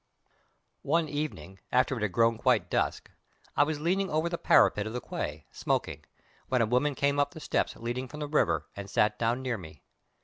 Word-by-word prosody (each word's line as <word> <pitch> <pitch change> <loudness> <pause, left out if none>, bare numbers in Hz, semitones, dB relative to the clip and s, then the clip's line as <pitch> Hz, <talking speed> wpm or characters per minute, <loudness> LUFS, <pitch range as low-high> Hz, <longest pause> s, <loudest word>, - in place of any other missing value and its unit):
One 160 +2 +1
evening, 120 - -5
after 130 +2 +3
it 115 - -5
had 105 -2 0
grown 115 +3 +2
quite 115 -9 +2
dusk, - - -1 0.4
I - - +4
was 150 0 -2
leaning 185 +5 0
over 155 +2 0
the 170 - -2
parapet 105 0 +4
of 110 - -6
the 125 - -2
quay, 75 - -5
smoking, - - -2 0.4
when 130 - +1
a - - +3
woman 125 +5 +1
came 140 +1 +1
up 145 0 0
the - - -7
steps - - -1
leading 120 +3 -4
from 150 +5 -9
the 150 - -2
river, 85 - +1
and 100 0 -7
sat 105 +1 +2
down 120 +3 0
near 125 -4 -2
me. 80 -4 -12
125 Hz, 200 wpm, -29 LUFS, 105-145 Hz, 0.4 s, I